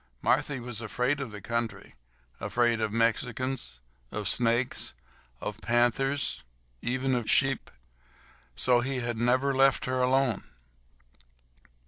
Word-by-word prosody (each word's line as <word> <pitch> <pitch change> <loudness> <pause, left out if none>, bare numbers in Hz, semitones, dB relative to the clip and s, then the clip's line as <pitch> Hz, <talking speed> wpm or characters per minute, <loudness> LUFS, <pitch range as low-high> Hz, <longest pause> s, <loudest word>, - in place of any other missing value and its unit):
Marthy 145 0 +2
was 120 -2 -5
afraid 125 +6 0
of 135 -4 -4
the 105 -1 -8
country—afraid 115 - -2
of 110 - 0
Mexicans, 115 - -1 0.3
of 105 -2 -3
snakes, 120 - +1 0.4
of 105 +1 -5
panthers, 120 +5 +1 0.4
even 130 +2 0
of 120 -3 -1
sheep. 135 -2 +2 0.9
So 125 -1 +3
he 130 +1 -1
had 120 -1 -2
never 130 +4 +2
left 135 0 +4
her 130 0 0
alone. 130 -3 +2
120 Hz, 110 wpm, -29 LUFS, 115-130 Hz, 0.9 s, left